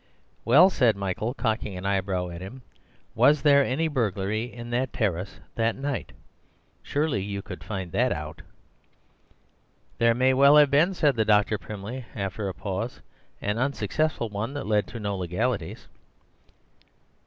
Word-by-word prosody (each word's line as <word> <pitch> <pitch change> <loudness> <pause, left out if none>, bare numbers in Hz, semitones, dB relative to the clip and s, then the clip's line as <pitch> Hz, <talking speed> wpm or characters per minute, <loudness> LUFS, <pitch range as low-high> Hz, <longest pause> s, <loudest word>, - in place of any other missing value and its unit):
"Well," 160 +11 +7
said 120 - +3
Michael, 100 +5 -3
cocking 110 -6 -2
an 90 - -7
eyebrow 95 -2 -1
at 85 0 -8
him, 120 +8 -9 0.5
"was 150 -1 +4
there 140 -2 +6
any 140 +5 0
burglary 110 - -1
in 120 0 -9
that 125 +1 0
terrace 95 -3 -2
that 115 0 0
night? 140 -2 -4 0.7
Surely 145 -8 -1
you 100 0 -5
could - - -9
find 95 -5 -5
that 125 +6 +1
out." 75 -1 -5 1.6
"There 115 0 +4
may 130 +2 +3
well 140 +3 +6
have 145 -2 +6
been," 165 +7 +3
said 145 -6 +2
the 110 - +3
doctor 105 -1 +2
primly, 105 +6 -7
after 100 0 -3
a - - -5
pause, - - -4 0.4
"an 105 +2 -1
unsuccessful 140 0 -1
one 110 +7 -4
that 145 - -4
led 105 -1 +1
to 115 - -8
no 100 -2 -2
legalities." 95 +1 -3
115 Hz, 150 wpm, -26 LUFS, 100-130 Hz, 1.6 s, Well